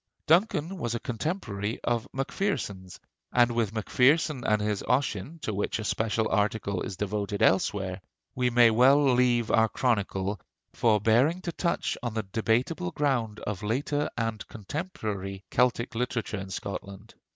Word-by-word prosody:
Duncan 175 0 +2
was 120 -4 -2
a - - -2
contemporary 115 - -3
of 120 0 0
Macpherson's, 130 - -3 0.3
and 120 -1 +4
with 115 -4 0
Macpherson 130 +5 +2
and 105 0 +3
his 105 -1 -1
'Ossian,' 125 - 0
to 110 - -2
which 100 - -1
a 110 - -4
special 110 +1 0
article 100 -1 0
is 95 - -5
devoted 105 0 -2
elsewhere, 95 -1 +1 0.3
we 125 -1 +1
may 120 -1 +6
well 135 +4 +5
leave 120 -2 +2
our 110 -1 +4
chronicle, 100 -6 -1 0.3
forbearing 115 - +3
to 175 - -3
touch 170 +1 -1
on 120 -3 -4
the 110 - -1
debatable 115 - 0
ground 120 -5 -1
of 100 -2 -4
later 145 +7 -1
and 115 -2 -2
contemporary 105 - -5
Celtic 125 -1 +1
literature 115 -3 -2
in 95 0 -7
Scotland. 100 +2 -7
115 Hz, 140 wpm, -28 LUFS, 105-125 Hz, 0.3 s, may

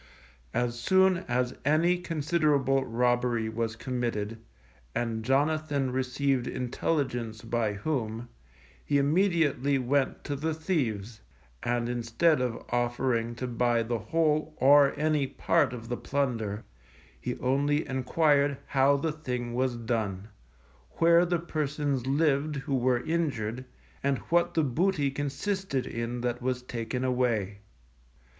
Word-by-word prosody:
As 120 -1 0
soon 190 +7 +4
as 125 0 0
any 165 +5 +3
considerable 150 -5 +1
robbery 120 -1 +1
was 110 0 -2
committed, 115 -3 -3 0.6
and 115 -2 -1
Jonathan 145 +1 +1
received 130 0 0
intelligence 125 -3 -2
by 115 -2 0
whom, 115 -1 -3 0.6
he 145 - +1
immediately 145 -3 +2
went 135 +1 0
to 145 - -3
the 155 +3 -2
thieves, 120 - -2 0.4
and 120 0 0
instead 120 +6 +1
of 125 -3 -3
offering 120 -1 0
to 125 - -4
buy 120 -1 +1
the 115 0 -2
whole 155 0 0
or 140 +1 +6
any 150 -2 +1
part 130 - +1
of 115 -2 -7
the 120 0 -3
plunder, 115 -7 -2 0.6
he - - -4
only 145 +4 +1
enquired 140 +1 +2
how 140 +1 +3
the 160 +3 -1
thing 125 -6 -4
was 130 0 0
done, 110 -4 -3 0.6
where 170 +1 +5
the 175 0 +1
persons 145 -5 -2
lived 150 +1 +1
who 135 0 -2
were 125 -1 +1
injured, 130 -8 -1 0.4
and 140 -1 +1 0.2
what 175 0 +3
the 160 - +3
booty 145 +1 +1
consisted 145 +2 -2
in 115 +1 -4
that 120 0 -2
was 125 0 -2
taken 125 +1 -4
away. 120 -6 0
130 Hz, 125 wpm, -28 LUFS, 120-150 Hz, 0.6 s, or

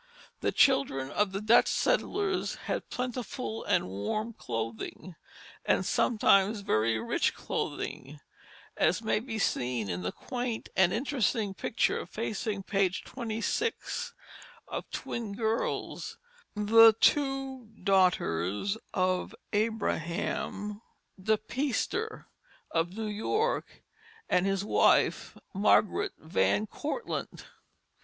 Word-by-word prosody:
The - - 0
children 145 - +3
of 205 +2 +1
the 195 +1 -3
Dutch 220 +2 +5
settlers 405 -6 0
had - - -3
plentiful 250 -2 -4
and 180 - +1
warm 105 - -3
clothing, 115 - -5 0.5
and - - +2
sometimes 210 -2 +3
very 110 - +1
rich 110 - 0
clothing, 145 +3 -4 0.6
as 185 +6 +2
may 220 - +2
be 225 -1 -5
seen 120 - 0
in 90 +1 -3
the 90 +1 -2
quaint 245 -2 -4
and 190 -2 +5
interesting 225 -5 0
picture 215 - 0
facing 215 -2 -3
page 195 -2 0
26, 425 - -3 0.5
of - - -5
twin 225 -4 -4
girls, 225 +1 -2 0.4
the 225 +2 +7
two 270 -3 +1 0.2
daughters 185 - +2 0.2
of 185 -1 0 0.2
Abraham 210 -1 -1 0.4
De 220 +3 +3
Peyster 285 - -2 0.5
of 175 +4 -1
New 220 - -2
York, 320 - -1 0.4
and 180 +1 +2
his 195 0 0
wife, - - +3 0.2
Margaret 215 - +3
Van 100 - +1
Cortlandt. 305 - -4
210 Hz, 105 wpm, -30 LUFS, 185-240 Hz, 0.6 s, the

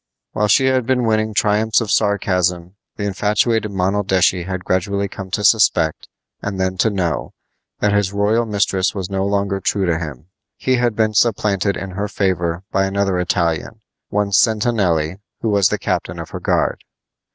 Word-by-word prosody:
While 105 - 0
she 120 +6 +4
had 130 -2 +1
been 125 -2 +1
winning 110 -1 +1
triumphs 105 +2 +2
of 110 -3 -3
sarcasm 90 -4 +1 0.2
the 105 - -5
infatuated 105 +2 +1
Monaldeschi 95 -2 +1
had 95 -1 -4
gradually 100 +2 0
come 95 0 -8
to 105 +2 -2
suspect, 100 -8 +3 0.3
and 100 -2 -4
then 95 0 0
to 110 - +3
know, 85 - -2 0.5
that 105 0 +2
his 105 -2 +1
royal 105 +3 +1
mistress 100 -2 0
was 95 -1 -4
no 95 0 -1
longer 100 -1 0
true 95 0 0
to 85 -2 0
him. 75 -4 -7 0.3
He 130 -1 +1
had 120 -2 +1
been 110 -1 +1
supplanted 100 -3 +1
in 95 +1 -6
her 100 +3 -3
favor 85 -3 -1
by 95 - +2
another 95 -1 0
Italian, 85 +4 -1 0.3
one 105 -1 0
Sentanelli, 100 -6 +2 0.2
who 115 - 0
was 100 -3 +3
the - - -1
captain - - -2
of - - -8
her - - -5
guard. - - 0
100 Hz, 170 wpm, -19 LUFS, 95-105 Hz, 0.5 s, she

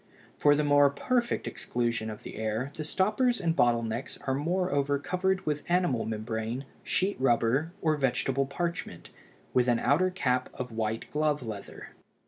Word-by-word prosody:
For 145 0 +4
the 150 - +1
more 145 -1 +5
perfect 240 - 0
exclusion 120 -2 -2
of 105 - -8
the - - -8
air 110 +5 -2
the 155 - -5
stoppers 215 +9 +1
and 165 -3 0
bottle 120 -4 +3
necks 115 +3 -4
are 135 - +1
moreover 145 -2 +1
covered 185 +5 -1
with 150 -1 -1
animal 175 -10 +2
membrane, 110 +3 -3 0.2
sheet 195 +2 0
rubber, 130 +5 +2
or 155 -2 +3
vegetable 135 0 +1
parchment, 170 +5 -4 0.4
with 125 -1 +3
an 120 -1 +4
outer 165 +10 +3
cap 130 -9 0
of 125 -2 -5
white 110 0 -2
glove 150 -2 +1
leather. 105 -4 -7
140 Hz, 155 wpm, -29 LUFS, 120-170 Hz, 0.4 s, more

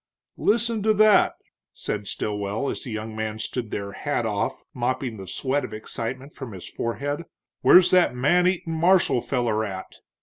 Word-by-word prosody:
"Listen 230 0 +2
to 215 +1 +3
that!" 215 0 +5 0.4
said 105 -1 -4
Stilwell, 105 +5 -2
as - - -5
the - - -7
young 110 0 -5
man 110 0 -3
stood 115 +1 -4
there 100 -1 -4
hat 145 0 -2
off, 110 0 -2
mopping 125 -1 -2
the 95 -1 -9
sweat 135 +9 -1
of - - -6
excitement 125 +6 -5
from 130 -6 -8
his 95 - -9
forehead. 145 +6 -3 0.4
"Where's 180 0 +7
that 180 -8 +4
man 175 +8 +3
eatin' 180 -2 -1
marshal 170 -6 +3
feller 120 -5 0
at?" 95 -3 -6
125 Hz, 165 wpm, -24 LUFS, 110-170 Hz, 0.4 s, Where's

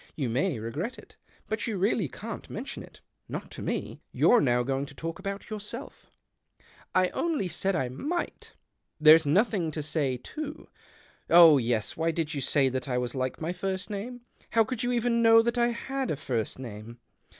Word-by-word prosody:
You 135 -6 -2
may 135 +5 0
regret 145 - -4
it. - - -15 0.3
But 215 0 -2
you 220 -3 -2
really 195 -1 +1
can't 215 - -8
mention 240 +6 -6
it - - -14 0.2
— - - -45
not - - -11
to - - -6
me. - - -3
You're 240 -2 +5
now 125 -1 +2
going 135 +2 -2
to 145 - -13
talk 165 +5 -5
about 195 +2 -6
yourself." 215 +5 -7 0.4
" - - -33 0.3
I 185 -1 +4
only 315 - -1
said 190 +3 -1
I 130 -5 0
miglit 300 - -4 0.5
There's 155 0 +7
nothing 190 +1 +2
to 155 0 -4
say, 145 -4 -1
too. 300 - -7 0.6
Oh 165 -4 +9
yes, 115 -3 -1
why 165 +1 0
did 160 -1 -2
you 140 - -3
say 135 +1 +3
that 130 +2 -3
I 125 - 0
was 125 -1 -2
like 130 -1 -2
my 165 +2 -2
first 190 +2 -3
name? 240 +5 -5 0.3
How 225 - +4
could 230 +2 -4
you 245 -1 0
even 235 -1 +1
know 225 0 +7
that 235 +1 0
I 235 - +4
had 265 +3 -3
a - - 0
first 120 -6 -2
name 115 -2 -8
175 Hz, 195 wpm, -28 LUFS, 135-225 Hz, 0.6 s, Oh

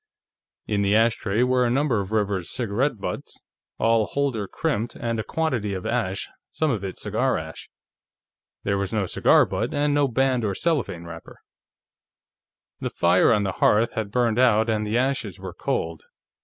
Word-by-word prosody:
In 105 -2 0
the 100 +1 +2
ashtray 110 -1 +2
were 125 0 +2
a 120 - +2
number 130 -2 +1
of 100 0 -5
River's 100 -5 -1
cigarette 125 +2 -1
butts, - - -5 0.4
all 115 -1 +2
holder 135 -8 -1
crimped, 120 -2 -2
and 115 -1 -2
a - - -1
quantity 125 -12 -1
of 95 - -6
ash, 110 -6 -1 0.2
some 155 -2 0
of 105 -6 -2
it 95 -1 -5
cigar - - 0
ash. - - -8 0.9
There 100 -1 0
was 100 -1 -2
no 110 -3 0
cigar - - +4
butt, - - -3
and 145 0 +1
no 145 -1 +3
band 130 0 +1
or 100 -3 -1
cellophane 140 - -1
wrapper. 85 -1 -10 1.4
The - - -3
fire 85 +2 +3
on 105 -2 +3
the 95 - -1
hearth 110 +3 +4
had 110 -2 -3
burned 120 0 +1
out 115 -3 +4
and 105 -1 -1
the 110 +3 0
ashes 130 -7 -1
were - - -7
cold. 80 0 -3
110 Hz, 170 wpm, -24 LUFS, 100-125 Hz, 1.4 s, cigar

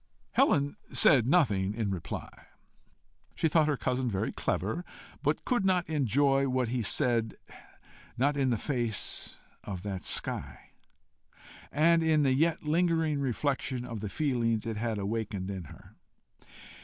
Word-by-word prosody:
Helen 140 0 +2
said 125 -5 +5
nothing 105 - +2
in 110 -3 -1
reply. 90 -4 -6 0.9
She - - +1
thought 155 0 +3
her 150 -2 +1
cousin 125 0 -1
very 95 -3 -1
clever, 110 - -2 0.4
but - - -1
could 245 -5 +1
not 185 -2 +2
enjoy 140 -1 +2
what 125 -2 0
he 125 0 -1
said 115 +1 +1 0.8
not 140 +4 +2
in 135 -2 +1
the 120 - +1
face 120 -4 -2 0.3
of 95 -3 -6
that 100 -3 -4
sky, - - -4 1.0
and 165 +3 +4
in 160 -2 +3
the 135 -2 +3
yet 160 +5 +1
lingering 160 -1 +1
reflection 130 -1 -1
of 115 -3 -6
the 105 0 -4
feelings 115 -4 0
it 115 -1 -3
had 115 0 -2
waked 105 +1 -2
in 95 -2 -5
her. - - -14
130 Hz, 140 wpm, -30 LUFS, 110-150 Hz, 1.0 s, said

